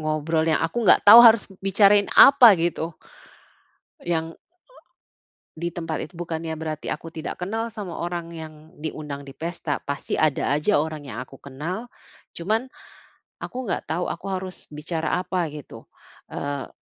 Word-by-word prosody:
ngobrol 155 Hz, +1 st, -1 dB
yang 160 Hz, -1 st, +1 dB
aku 165 Hz, +8 st, -3 dB
nggak -, -, +5 dB
tahu 225 Hz, -, +12 dB
harus 225 Hz, -3 st, +6 dB, 0.2 s
bicarain 200 Hz, +1 st, +5 dB
apa, 265 Hz, -5 st, +9 dB
gitu. 165 Hz, -1 st, -2 dB, 1.1 s
Yang 165 Hz, -1 st, -2 dB
a -, -, -72 dB, 1.1 s
di 170 Hz, +1 st, -4 dB
tempat 165 Hz, -2 st, -4 dB
itu 155 Hz, -, -15 dB
bukannya 165 Hz, -1 st, -4 dB
berarti 155 Hz, -1 st, -4 dB
aku 165 Hz, -, -7 dB
tidak 160 Hz, 0 st, -7 dB
kenal 225 Hz, +5 st, -3 dB
sama 205 Hz, -5 st, -7 dB
orang 170 Hz, -1 st, -4 dB
yang 160 Hz, 0 st, -11 dB
diundang 150 Hz, -2 st, -6 dB
di 140 Hz, -, -11 dB
pesta. 165 Hz, -1 st, -4 dB
Pasti 140 Hz, +1 st, -6 dB
ada 150 Hz, -3 st, +1 dB
aja 150 Hz, +8 st, +2 dB
orang 150 Hz, -1 st, -3 dB
yang 115 Hz, -, -7 dB
aku 135 Hz, +1 st, -16 dB
kenal. 165 Hz, -, -6 dB, 0.5 s
Cuman, 220 Hz, +9 st, -1 dB, 0.7 s
aku 255 Hz, +1 st, -6 dB
nggak 210 Hz, -, -4 dB
tahu 175 Hz, +2 st, -1 dB
aku 170 Hz, -, -9 dB
harus 185 Hz, -1 st, -6 dB
bicara 160 Hz, +3 st, -3 dB
apa 180 Hz, -2 st, -2 dB
gitu. 150 Hz, -1 st, -11 dB, 0.4 s
Eee 140 Hz, -1 st, -5 dB
165 Hz, 150 wpm, -23 LUFS, 155-185 Hz, 1.1 s, tahu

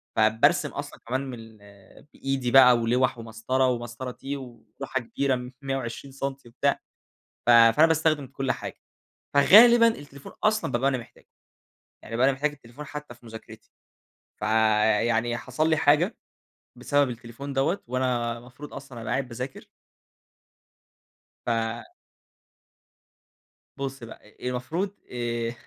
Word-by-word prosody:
فبارسم 110 Hz, +1 st, +3 dB
أصلًا -, -, -7 dB
كمان 130 Hz, +3 st, -1 dB
من 125 Hz, -, -6 dB
ال 105 Hz, 0 st, -16 dB
بإيدي 135 Hz, -2 st, -2 dB
بقى 125 Hz, -2 st, +8 dB
ولوّح 120 Hz, +2 st, +1 dB
ومسطرة، 115 Hz, +3 st, -1 dB
ومسطرة 120 Hz, +1 st, -3 dB
تي، 140 Hz, +3 st, -6 dB
ولوحة 130 Hz, +1 st, -6 dB
كبيرة 125 Hz, +1 st, -2 dB
120 135 Hz, 0 st, -4 dB
سَنتي 135 Hz, -1 st, -5 dB
وبتاع. 140 Hz, +4 st, 0 dB, 0.7 s
ف 120 Hz, -, +5 dB
فأنا 115 Hz, +6 st, +7 dB
باستخدم 160 Hz, -3 st, +1 dB
كل 135 Hz, 0 st, -2 dB
حاجة. -, -, -7 dB, 0.6 s
فغالبًا، 230 Hz, +10 st, +8 dB
التليفون 145 Hz, -10 st, -6 dB
أصلًا 215 Hz, +1 st, +1 dB
بابقى 130 Hz, +3 st, +2 dB
أنا 130 Hz, -, -1 dB
محتاجه، 120 Hz, -, -14 dB, 0.7 s
يعني 115 Hz, -, -7 dB
بابقى 125 Hz, +3 st, +3 dB
أنا 135 Hz, -, +3 dB
محتاج 145 Hz, +3 st, -1 dB
التليفون 140 Hz, 0 st, -12 dB
حتى 150 Hz, -2 st, -8 dB
في 120 Hz, 0 st, -21 dB
مذاكرتي. 110 Hz, 0 st, -12 dB, 0.7 s
فيعني 110 Hz, +2 st, +2 dB
حصل 140 Hz, +6 st, -1 dB
لي 160 Hz, -, +3 dB
حاجة، 155 Hz, +7 st, +3 dB, 0.6 s
بسبب 145 Hz, -2 st, +1 dB
التليفون 120 Hz, +4 st, -8 dB
دوّة 145 Hz, +8 st, 0 dB
وأنا 120 Hz, -2 st, -1 dB
المفروض 125 Hz, +5 st, -12 dB
أصلًا 135 Hz, -4 st, -9 dB
أبقى 110 Hz, 0 st, -5 dB
قاعد 130 Hz, +1 st, -1 dB
باذاكر. 125 Hz, +2 st, -7 dB, 1.8 s
ف -, -, -2 dB, 2.3 s
بُص 135 Hz, -2 st, -5 dB
بقى، 110 Hz, -2 st, -13 dB
المفروض 160 Hz, +10 st, -3 dB, 0.2 s
آآ، 120 Hz, -1 st, -2 dB
130 Hz, 125 wpm, -26 LUFS, 115-140 Hz, 2.3 s, بقى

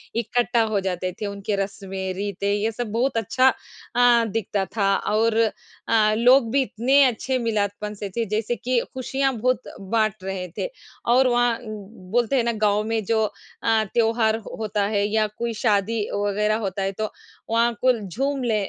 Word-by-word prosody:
इकट्ठा 235 Hz, +1 st, +1 dB
हो 200 Hz, -, +3 dB
जाते 185 Hz, 0 st, -2 dB
थे, -, -, -1 dB
उनके 200 Hz, +1 st, -3 dB
रस्में-रीते 195 Hz, 0 st, -3 dB
ये 210 Hz, +2 st, 0 dB
सब 225 Hz, -1 st, -5 dB
बहुत 240 Hz, +3 st, 0 dB
अच्छा 255 Hz, +4 st, +3 dB, 0.5 s
अ, 240 Hz, -1 st, +5 dB
दिखता 205 Hz, -2 st, -1 dB
था। 195 Hz, -2 st, +3 dB, 0.2 s
और 225 Hz, +1 st, +2 dB, 0.5 s
अ, 215 Hz, -1 st, +4 dB
लोग 245 Hz, 0 st, +5 dB
भी 275 Hz, +2 st, +3 dB
इतने 265 Hz, +3 st, +3 dB
अच्छे 255 Hz, +1 st, 0 dB
मिलादपन 210 Hz, -1 st, -1 dB
से 200 Hz, -, -3 dB
थे 230 Hz, -, +1 dB
जैसे 225 Hz, +2 st, -1 dB
कि 250 Hz, +1 st, 0 dB
खुशियाँ 265 Hz, +1 st, -1 dB
बहुत 255 Hz, +3 st, +1 dB, 0.3 s
बाँट 215 Hz, -3 st, +1 dB
रहे 190 Hz, -1 st, -4 dB
थे -, -, -2 dB, 0.5 s
और 260 Hz, +1 st, +5 dB
वहाँ 240 Hz, -1 st, +2 dB
उम, 215 Hz, -4 st, -8 dB, 0.2 s
बोलते 240 Hz, +3 st, +2 dB
हैं 250 Hz, -, +3 dB
ना 235 Hz, -, +1 dB, 0.2 s
गाँव 205 Hz, +1 st, +1 dB
में 225 Hz, -1 st, 0 dB
जो 220 Hz, +2 st, +2 dB, 0.4 s
अ, 225 Hz, -1 st, +3 dB
त्योहार 225 Hz, -1 st, +2 dB, 0.2 s
होता 210 Hz, -2 st, 0 dB
है 200 Hz, -, +2 dB
या 215 Hz, 0 st, +1 dB
कोई 235 Hz, 0 st, -2 dB
शादी 215 Hz, 0 st, +2 dB
वगैरह 205 Hz, +1 st, +1 dB
होता 195 Hz, +1 st, -4 dB
है 195 Hz, -, 0 dB
तो 215 Hz, -, -2 dB, 0.4 s
वहाँ 230 Hz, +1 st, +2 dB
को 255 Hz, -, +5 dB
ल 220 Hz, -5 st, -4 dB
झूम 275 Hz, 0 st, 0 dB
ले 230 Hz, -3 st, +1 dB
220 Hz, 175 wpm, -23 LUFS, 205-240 Hz, 0.5 s, अ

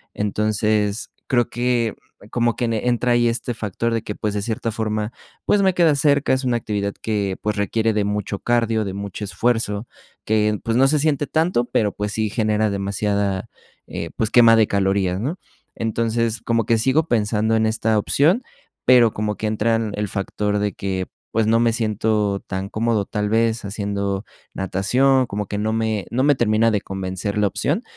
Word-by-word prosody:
entonces, 105 Hz, 0 st, 0 dB, 0.2 s
creo 120 Hz, -2 st, +2 dB
que 120 Hz, -2 st, 0 dB, 0.4 s
como 120 Hz, -1 st, +1 dB
que -, -, -3 dB
en 115 Hz, -, -1 dB
entra 120 Hz, +2 st, 0 dB
ahí 120 Hz, 0 st, +3 dB
este 120 Hz, +1 st, -2 dB
factor 115 Hz, +1 st, -2 dB
de 115 Hz, -, 0 dB
que, 105 Hz, -, -5 dB
pues, 105 Hz, -1 st, -2 dB
de 105 Hz, -, -1 dB
cierta 115 Hz, +2 st, -2 dB
forma, 110 Hz, 0 st, -2 dB, 0.3 s
pues 205 Hz, -, +3 dB
me 190 Hz, -1 st, +3 dB
queda 170 Hz, -4 st, +4 dB
cerca, 140 Hz, 0 st, +2 dB
es 130 Hz, 0 st, 0 dB
una 125 Hz, -1 st, +1 dB
actividad 100 Hz, -3 st, -2 dB
que, 100 Hz, -3 st, -1 dB
pues 105 Hz, 0 st, -2 dB
requiere 110 Hz, +2 st, +1 dB
de 105 Hz, -1 st, 0 dB
mucho 105 Hz, -1 st, -2 dB
cardio, 115 Hz, -2 st, +1 dB
de 95 Hz, -, -4 dB
mucho 100 Hz, +1 st, -5 dB
esfuerzo, 115 Hz, 0 st, -1 dB, 0.4 s
que, 105 Hz, -1 st, +2 dB
pues 115 Hz, +1 st, 0 dB
no 135 Hz, +1 st, +5 dB
se 150 Hz, +1 st, +2 dB
siente 145 Hz, -1 st, +1 dB
tanto, 160 Hz, -6 st, +1 dB
pero, 105 Hz, -3 st, 0 dB
pues 105 Hz, 0 st, -3 dB
sí 110 Hz, 0 st, -1 dB
genera 110 Hz, 0 st, +1 dB
demasiada, 100 Hz, 0 st, -1 dB, 0.4 s
eh, -, -, -5 dB
pues 110 Hz, -, 0 dB
quema 115 Hz, -2 st, +7 dB
de 110 Hz, -2 st, +4 dB
calorías, 95 Hz, -2 st, +1 dB
¿no?, 150 Hz, -, -2 dB, 0.4 s
entonces, 115 Hz, 0 st, -1 dB
como 115 Hz, -2 st, 0 dB
que 115 Hz, -, +3 dB
sigo 135 Hz, +8 st, +2 dB
pensando 110 Hz, -2 st, +1 dB
en 110 Hz, -, +2 dB
esta 110 Hz, 0 st, +1 dB
opción, 160 Hz, -, +2 dB, 0.4 s
pero 120 Hz, -3 st, +6 dB
como 105 Hz, 0 st, -2 dB
que 110 Hz, -, -2 dB
entran 110 Hz, 0 st, 0 dB
el 105 Hz, 0 st, -2 dB
factor 105 Hz, +1 st, -2 dB
de 105 Hz, 0 st, 0 dB
que, 95 Hz, -1 st, -3 dB, 0.2 s
pues, 110 Hz, -1 st, +1 dB
no 115 Hz, +1 st, +4 dB
me 115 Hz, -1 st, +2 dB
siento 110 Hz, -2 st, 0 dB
tan 95 Hz, +1 st, -4 dB
cómodo 110 Hz, -1 st, 0 dB
tal 105 Hz, 0 st, -2 dB
vez 115 Hz, 0 st, +1 dB
haciendo 100 Hz, -1 st, -2 dB, 0.3 s
natación, 125 Hz, +8 st, +2 dB
como 105 Hz, -1 st, -4 dB
que 105 Hz, -, -4 dB
no 110 Hz, +1 st, -1 dB
me 110 Hz, -3 st, -1 dB
no 125 Hz, -, 0 dB
me 145 Hz, 0 st, +4 dB
termina 115 Hz, -2 st, +2 dB
de 105 Hz, -2 st, 0 dB
convencer 95 Hz, +1 st, -4 dB
la 105 Hz, -, +3 dB
opción, -, -, -1 dB
110 Hz, 185 wpm, -21 LUFS, 105-115 Hz, 0.4 s, quema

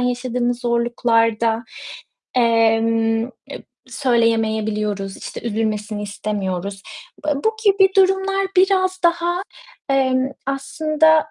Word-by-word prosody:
yaşadığımız 245 Hz, 0 st, -1 dB
zorluklarda, 235 Hz, -1 st, +1 dB, 0.7 s
emm, 225 Hz, -1 st, +2 dB
eee, 245 Hz, -, -9 dB, 0.6 s
söyleyemeyebiliyoruz, 220 Hz, -5 st, 0 dB
işte, -, -, -8 dB
üzülmesini 215 Hz, -2 st, -2 dB
istemiyoruz. 200 Hz, -2 st, -4 dB, 0.4 s
B 305 Hz, -, 0 dB
e, 295 Hz, -, +2 dB
bu 440 Hz, 0 st, +1 dB
gibi 390 Hz, -1 st, +5 dB
durumlar 385 Hz, 0 st, +2 dB
biraz 370 Hz, 0 st, +3 dB
daha, 345 Hz, +2 st, +1 dB, 0.5 s
emm, 260 Hz, -1 st, +2 dB, 0.2 s
aslında 310 Hz, +3 st, +2 dB
240 Hz, 90 wpm, -20 LUFS, 225-310 Hz, 0.7 s, gibi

